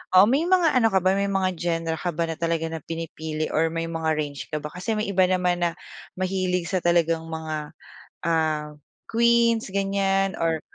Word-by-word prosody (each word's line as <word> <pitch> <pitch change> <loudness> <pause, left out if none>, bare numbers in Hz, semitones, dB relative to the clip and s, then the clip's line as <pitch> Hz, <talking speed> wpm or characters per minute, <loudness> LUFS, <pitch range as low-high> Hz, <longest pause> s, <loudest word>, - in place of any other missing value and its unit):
Oo, 185 - +9
may 280 +6 +2
mga 355 -6 +4
ano 230 -3 +5
ka 190 - +4
ba, 185 - +4
may 200 0 +1
mga 190 -1 +1
genre 165 -1 -1
ka 175 0 -2
ba 170 - 0
na 165 - -4
talaga 165 -1 -1
na 165 - -4
pinipili 160 -1 -4
or 165 +1 +2
may 165 0 -2
mga 160 -1 0
range 145 -2 -4
ka 150 - -1
ba 150 - -5
kasi 180 +7 -3
may 215 -1 -2
iba 190 -1 +4
naman 180 -1 +1
na 170 - +1 0.4
mahilig 185 -2 -1
sa 190 - +1
talagang 165 -1 +2
mga, 160 -1 -5 0.5
ah, 155 -2 0 0.3
Queens 235 -2 +3
ganiyan 195 0 +1
or 165 -1 0
175 Hz, 190 wpm, -24 LUFS, 160-195 Hz, 0.5 s, Oo